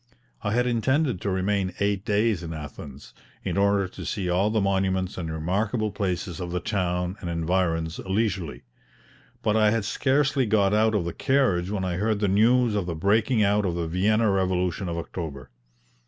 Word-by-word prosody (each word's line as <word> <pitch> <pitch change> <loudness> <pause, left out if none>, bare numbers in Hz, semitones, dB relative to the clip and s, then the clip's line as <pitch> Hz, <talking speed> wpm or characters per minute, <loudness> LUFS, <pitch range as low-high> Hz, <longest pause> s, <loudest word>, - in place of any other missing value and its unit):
I 100 -1 -1
had 125 +1 +2
intended 125 - +1
to 100 - -1
remain 95 0 0
eight 100 -1 0
days 105 -2 +1
in 80 -1 -6
Athens, 75 -2 -9 0.3
in - - -2
order 100 0 +2
to - - -9
see 95 -4 -2
all 95 +4 +2
the 110 0 +1
monuments 95 -2 0
and 80 -3 -4
remarkable 100 +7 -1
places 95 -3 -3
of 90 -1 -4
the 90 +1 -2
town 90 -1 -2
and 85 - -4
environs 85 -1 -1
leisurely; 95 -4 -2 0.8
but 105 - +2
I 110 -1 +4
had 110 -1 0
scarcely 135 +3 +1
got 100 -2 +3
out 110 +1 +3
of 95 -5 0
the 85 - -3
carriage 110 -10 +1
when 100 -2 -2
I 90 -1 -2
heard 105 +1 0
the 100 - +1
news 115 +4 +3
of 100 -4 -1
the 85 - -3
breaking 110 +6 +2
out 105 +1 +2
of 90 -3 -1
the 85 -1 -2
Vienna 105 +5 +2
revolution 95 -1 0
of 85 - -3
October. 80 -5 -6
100 Hz, 185 wpm, -25 LUFS, 90-110 Hz, 0.8 s, I